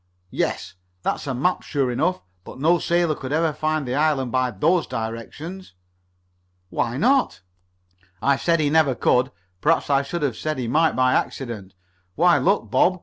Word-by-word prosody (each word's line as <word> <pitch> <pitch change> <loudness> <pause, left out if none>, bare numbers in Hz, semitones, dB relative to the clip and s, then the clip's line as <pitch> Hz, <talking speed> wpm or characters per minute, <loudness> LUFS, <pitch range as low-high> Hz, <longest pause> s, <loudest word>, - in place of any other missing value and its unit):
"Yes. - - -2 0.3
That's - - -2
a 135 - -2
map, 180 +9 +1
sure 135 -4 -1
enough, 160 +9 0 0.2
but - - -11
no 165 +5 +3
sailor 170 -2 +1
could 135 -2 -7
ever 160 +1 +1
find 155 -1 -1
the 125 - -2
island 145 -4 +1
by 130 -1 +1
those 160 - +1
directions." 115 - -6 1.0
"Why 120 +2 -1
not?" 255 - +2 0.8
"I 140 0 +3
said 165 +4 +1
he 145 -2 +1
never 155 -5 +3
could. 125 +2 +2 0.3
Perhaps 165 -2 +2
I 135 0 +4
should 160 +4 -4
have 135 -6 -1
said 155 0 -3
he 125 -2 -3
might 160 +7 +2
by 130 0 +3
accident. 110 -7 -3 0.4
Why, 175 +2 +4
look, 195 +3 +1
Bob. 185 0 +3
150 Hz, 165 wpm, -23 LUFS, 130-165 Hz, 1.0 s, I